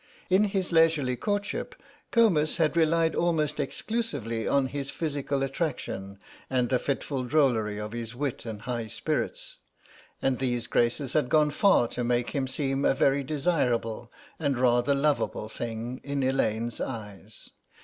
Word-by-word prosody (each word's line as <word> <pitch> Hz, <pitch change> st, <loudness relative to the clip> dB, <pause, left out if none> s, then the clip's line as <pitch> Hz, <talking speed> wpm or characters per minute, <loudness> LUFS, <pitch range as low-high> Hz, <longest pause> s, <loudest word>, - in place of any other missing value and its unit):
In 195 Hz, +3 st, +5 dB
his 195 Hz, -3 st, -1 dB
leisurely 160 Hz, -6 st, +3 dB
courtship 205 Hz, -, -2 dB, 0.3 s
Comus 180 Hz, -10 st, +3 dB
had 160 Hz, -1 st, +2 dB
relied 165 Hz, 0 st, +3 dB
almost 155 Hz, -3 st, 0 dB
exclusively 135 Hz, -, -2 dB
on 140 Hz, -1 st, +3 dB
his 140 Hz, +1 st, -4 dB
physical 140 Hz, -2 st, -2 dB
attraction 130 Hz, -, -3 dB, 0.3 s
and 125 Hz, -2 st, +1 dB
the 130 Hz, -, +2 dB
fitful 135 Hz, -1 st, -2 dB
drollery 120 Hz, -7 st, +2 dB
of 105 Hz, 0 st, -5 dB
his 115 Hz, 0 st, -5 dB
wit 140 Hz, -1 st, -3 dB
and 110 Hz, -2 st, -7 dB
high 120 Hz, -3 st, -3 dB
spirits, -, -, -3 dB, 0.6 s
and 135 Hz, -1 st, 0 dB
these 120 Hz, -2 st, -1 dB
graces 120 Hz, +3 st, 0 dB
had 145 Hz, -5 st, +2 dB
gone 150 Hz, +1 st, +4 dB
far 170 Hz, -, +4 dB
to 125 Hz, -, -3 dB
make 120 Hz, 0 st, 0 dB
him 135 Hz, -2 st, -1 dB
seem 135 Hz, 0 st, -1 dB
a -, -, +3 dB
very 140 Hz, +1 st, +3 dB
desirable 130 Hz, -7 st, 0 dB, 0.3 s
and 140 Hz, -5 st, 0 dB
rather 125 Hz, +2 st, +3 dB
lovable 140 Hz, -6 st, 0 dB
thing 115 Hz, +2 st, -5 dB
in 140 Hz, -1 st, -2 dB
Elaine's 120 Hz, -3 st, 0 dB
eyes. 105 Hz, -3 st, -7 dB
135 Hz, 145 wpm, -27 LUFS, 120-150 Hz, 0.6 s, In